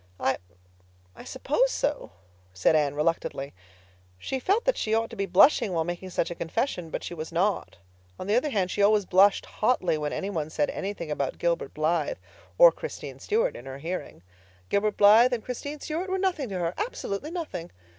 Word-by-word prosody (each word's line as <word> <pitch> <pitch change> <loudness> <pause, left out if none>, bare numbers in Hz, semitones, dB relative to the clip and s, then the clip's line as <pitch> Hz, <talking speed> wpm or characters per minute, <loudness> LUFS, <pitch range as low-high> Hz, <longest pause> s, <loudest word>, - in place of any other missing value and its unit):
"I—I 90 -4 -7
suppose 300 - +1
so," 295 -10 -2 0.4
said 90 - +3
Anne 145 -2 +2
reluctantly. 150 -3 -1 0.6
She 265 - -3
felt 400 - +1
that - - +3
she 220 -1 0
ought 225 +1 0
to - - -7
be 195 -2 -2
blushing 200 +2 +5
while 165 -1 +1
making 175 +2 -5
such 175 - -1
a - - -1
confession; 175 - -2
but - - -4
she - - -5
was 160 -1 -6
not; 185 - 0 0.4
on - - -6
the 205 - 0
other 260 +5 +2
hand, 190 -7 0
she 205 - -1
always 205 0 +4
blushed 195 +3 +4
hotly 185 -9 0
when 150 -1 -2
any 200 +1 -3
one 155 -5 -3
said 150 -2 0
anything 190 -5 -5
about 140 -2 -2
Gilbert 170 -5 -1
Blythe 165 - 0 0.4
or - - +9
Christine 480 - -7
Stuart 460 +4 0
in - - -10
her 135 0 -6
hearing. 165 - -6 0.5
Gilbert 210 +1 +1
Blythe 220 +5 +7
and 230 -3 -3
Christine 285 +4 -5
Stuart 330 +6 -4
were 380 - 0
nothing 360 - -1
to 190 - -3
her—absolutely 200 - -3
nothing. 320 - -5
195 Hz, 185 wpm, -27 LUFS, 160-260 Hz, 0.6 s, or